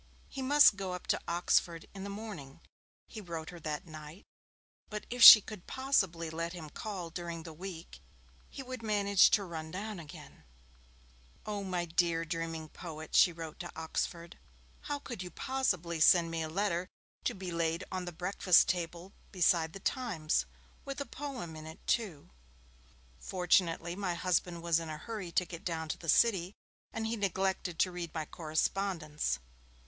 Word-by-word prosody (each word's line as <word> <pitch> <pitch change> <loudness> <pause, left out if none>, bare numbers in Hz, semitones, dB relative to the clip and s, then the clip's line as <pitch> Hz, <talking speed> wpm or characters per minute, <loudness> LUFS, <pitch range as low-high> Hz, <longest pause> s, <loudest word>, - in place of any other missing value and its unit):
He 270 - -6
must 275 -5 +6
go 190 -2 -3
up 180 - -6
to - - -4
Oxford 170 -1 +1
in 195 -1 -7
the 200 - -5
morning, 200 -10 -8 0.5
he 220 - -8
wrote 165 -4 -6
her 175 - -10
that 155 +2 -4
night, 155 +2 -11 0.6
but 210 -1 -5
if 245 0 -3
she 215 - +14
could 205 -3 -10
possibly 195 -12 0
let 165 +1 -3
him 160 -4 -8
call 185 -5 -5
during 170 -1 -5
the 165 -1 -9
week 175 0 -8 0.5
he 270 - -7
would 255 -2 -7
manage 200 -3 +4
to 205 - +3
run 160 -3 -6
down 200 +3 -5
again. 155 -3 -12 1.0
'Oh, 205 -1 -3
my 180 -2 -2
dear, 170 -1 +1
dreaming 165 0 -4
poet,' 160 -1 -9
she 175 - +6
wrote 165 -2 -8
to - - -6
Oxford, 170 +1 -4 0.5
'how 290 - -2
could 245 -8 -7
you 180 - -6
possibly 180 -11 -1
send 165 +1 +5
me 165 -1 -2
a 160 - -3
letter 180 0 -1 0.4
to 245 - 0
be 185 -2 -6
laid 165 +1 -1
on 185 -1 -3
the 175 - -5
breakfast 180 +1 +4
table 175 +1 -3 0.2
beside 170 -3 +3
The 195 - -8
Times! 190 -10 -1 0.4
With 275 0 -6
a 280 - -3
poem 260 - -6
in 155 0 -9
it, 160 - -12
too. 190 - -1 0.9
Fortunately 175 -2 +1
my 185 -3 -2
husband 175 -1 0
was 170 -1 +3
in 165 -1 -6
a 155 - -5
hurry 205 0 -6
to 180 - +2
get 170 -1 -9
down 160 -2 -3
to - - -2
the 165 - -6
City, 190 0 +3 0.4
and 225 - -3
he 225 +1 -1
neglected 190 -3 -1
to 185 - +2
read 175 -2 -5
my 160 -1 -2
correspondence. 155 - -1
175 Hz, 170 wpm, -32 LUFS, 165-200 Hz, 1.0 s, she